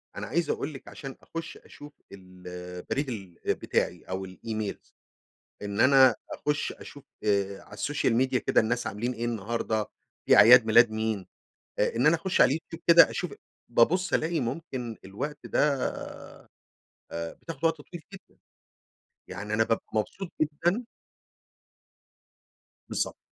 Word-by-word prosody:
أنا - - -5
عايز 170 +4 0
أقول 155 - -2
لِك 135 - -11
عشان 135 -1 -8
أخش 165 0 -7
أشوف 145 0 -13 0.2
البريد 90 +6 -6
ال 95 -7 -7 0.2
بتاعي - - -1
أو 95 +1 -5
الEmails، 110 +2 -6 0.7
إن 100 0 -4
أنا 130 -2 +7 0.2
أخش 150 0 -1
أشوف 145 - -12 0.2
آآ 100 -2 0
على - - -16
السوشيال 120 +2 0
ميديا 130 +1 +2
كده - - +3
الناس 120 +2 -1
عاملين 120 +5 -3
إيه 120 0 -4
النهارده، 115 -1 -1 0.4
في - - +7
أعياد 120 +1 +9
ميلاد 115 +1 +6
مين، 110 -3 -2 0.5
آآ - - +1
إن 125 +5 +2
أنا 160 +2 +6
أخش 180 +3 -1
على - - +8
اليوتيوب 165 +4 -4
كده 170 0 +8
أشوف، 180 - -4 0.4
بابص 175 +11 +3
ألاقي 165 +1 +1
ممكن 125 -3 -4
الوقت 130 +11 -5
ده - - 0 1.5
آآ 85 0 -4
بتاخد 165 -1 -7
وقت 165 -1 +2
طويل 170 +2 -11
جدًا، 195 - -15 0.9
يعني 105 +1 -5
أنا 110 +1 +3
بابقى 115 0 -1
مبسوط 165 - -3
جدًا. 170 +9 0 2.1
بالضبط، - - -2
120 Hz, 135 wpm, -28 LUFS, 105-150 Hz, 2.1 s, أعياد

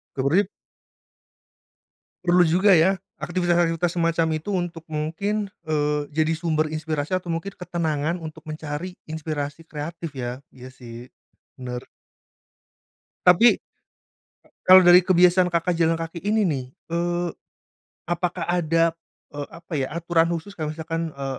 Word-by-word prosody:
Turip? 160 +9 +2 1.8
Perlu 175 0 +5
juga 185 +4 +5
ya 185 +4 +4 0.2
aktivitas-aktivitas 175 -1 +1
semacam 165 0 +2
itu 160 +7 -7
untuk 175 -2 -3
mungkin, 195 +7 -2 0.2
eee, 150 -1 0
jadi 155 +1 +1
sumber 160 -2 +1
inspirasi 155 +1 -2
atau 180 -2 -2
mungkin 165 +4 -3
ketenangan 170 -2 -2
untuk 160 -1 -8
mencari 155 +3 -5
inspirasi 155 -1 -4
kreatif 160 0 -6
ya. 125 +1 -5
Iya 130 0 -12
sih, 120 -1 -11 0.5
bener. 125 -1 -6 1.4
Tapi, 180 +7 +7
e - - -56 0.9
kalau 185 0 +10
dari 175 +1 +9
kebiasaan 180 0 +4
Kakak 170 +1 0
jalan 165 0 +2
kaki 165 +1 -6
ini 210 +3 +1
nih, 145 -8 -1 0.3
eee, 175 +1 0 0.8
apakah 175 +1 -2
ada, 165 -1 +2 0.4
eee, 145 -1 -4
apa 170 +1 -14
ya, 130 - 0
aturan 170 0 +2
khusus 170 +4 -4
kalau 155 -2 -3
misalkan 165 +1 -3
e 140 0 -6
165 Hz, 125 wpm, -24 LUFS, 155-175 Hz, 1.8 s, kalau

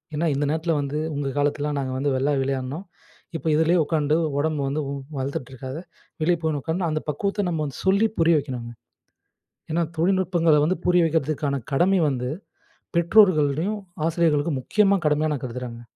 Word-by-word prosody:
ஏன்னா 160 +3 0
இந்த 145 +2 0
நேரத்தில 160 +2 0
வந்து 140 +1 -3 0.2
உங்க 145 -1 -2
காலத்தில 145 +1 0
நாங்க 130 -1 -3
வந்து 140 +2 0
வெளிய 140 +3 +1
விளையாடினோம். 135 +6 -3 0.5
இப்ப 165 - -4
இதுலே 160 +3 +3
உட்காந்து 150 -1 +1 0.2
உடம்பு 155 0 0
வந்து 145 +3 -1
வந் 140 0 -4 0.2
வளர்த்துட்ருக்காத! 135 -1 -5 0.4
வெளியே 170 +2 +2
போயின்னு 155 -3 -1
உட்கார்ந்து 170 +5 -1
அந்த 155 0 -1
பக்குவத்த 200 +7 -1
நம்ம 165 -3 -1
வந்து 140 - -7
சொல்லி 200 +4 +4
புரிய 165 -1 +5
வைக்கணுங்க. 125 -4 -6 1.0
ஏன்னா 170 +2 +1
தொழில்நுட்பங்கள 175 -2 +2
வந்து 180 +3 0
புரிய 180 -1 +4
வைக்கிறதுக்கான 150 -3 -1
கடமை 185 +7 +3
வந்து 125 -2 -2 0.7
பெற்றோர்களிடயும், 170 0 +3 0.3
ஆசிரியர்களுக்கும் 160 -3 +1
முக்கியமா 200 +7 +3
கடமையா, 150 +1 +2
நான் 140 - -5
கருதுகிறேங்க. 120 -1 -6
155 Hz, 150 wpm, -24 LUFS, 140-170 Hz, 1.0 s, புரிய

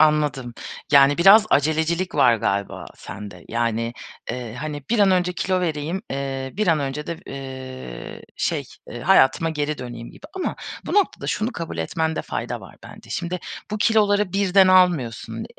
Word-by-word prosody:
Anladım. 150 -6 +2 0.4
Yani, 140 +2 +6
biraz 205 +4 +8
acelecilik 160 +5 +1
var 120 -2 +5
galiba 100 -1 -2
sende. 100 -3 -9
Yani, 115 0 -1 0.4
eee, 120 -3 -5
hani, 145 +2 -5
bir 235 - +2
an 200 -2 +5
önce 180 -1 +2
kilo 185 +1 0
vereyim, 165 +2 -2
eee, 135 -1 -3
bir 215 - 0
an 165 -3 +4
önce 140 +2 -3
de, 170 - -4
eee, 130 - -8
şey, - - -1 0.3
eee, - - -7
hayatıma 165 +5 +4
geri 150 -1 -2
döneyim 120 -1 -7
gibi. 295 - -13
Ama 375 - -2 0.3
bu - - -3
noktada 410 -2 +1
şunu 220 +4 -1
kabul 165 - -6
etmende 160 - -1
fayda - - -4
var - - -13
bence. - - -13
Şimdi 175 +1 -3 0.3
bu 210 - -2
kiloları 210 -3 +3
birden 195 -1 +4
almıyorsun. 175 - +2
150 Hz, 160 wpm, -23 LUFS, 130-185 Hz, 0.4 s, biraz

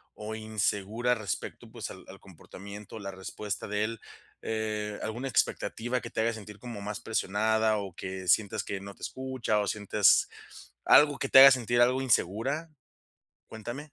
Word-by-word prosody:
o 110 +1 -6
insegura 110 +2 -1
respecto, 105 -4 -5
pues, - - -6
al - - -12
al - - -12
comportamiento, 100 +2 -11
la 100 -1 -6
respuesta 95 +2 -6
de 105 +1 -1
él? 115 0 -5 0.4
Eh, 105 -1 -3
¿Alguna 120 +5 -4
expectativa 120 0 -1
que 115 - -7
te - - -2
haga 115 +1 +1
sentir 105 -1 -10
como 115 -5 -7
más 105 +2 -5
presionada 110 0 +1
o 100 -3 -5
que 95 0 -6
sientas 100 +2 +2
que 100 - -4
no 100 0 -9
te - - -24
escucha 130 -5 -2
o 105 - -1
sientes 105 -1 +3 0.6
algo 145 -1 +6
que 135 - -2
te 135 - +9
haga 135 0 +11
sentir 120 -1 +2
algo 125 +2 +3
insegura? 130 - 0 0.8
Cuéntame. 120 +7 -8
110 Hz, 165 wpm, -29 LUFS, 105-120 Hz, 0.8 s, haga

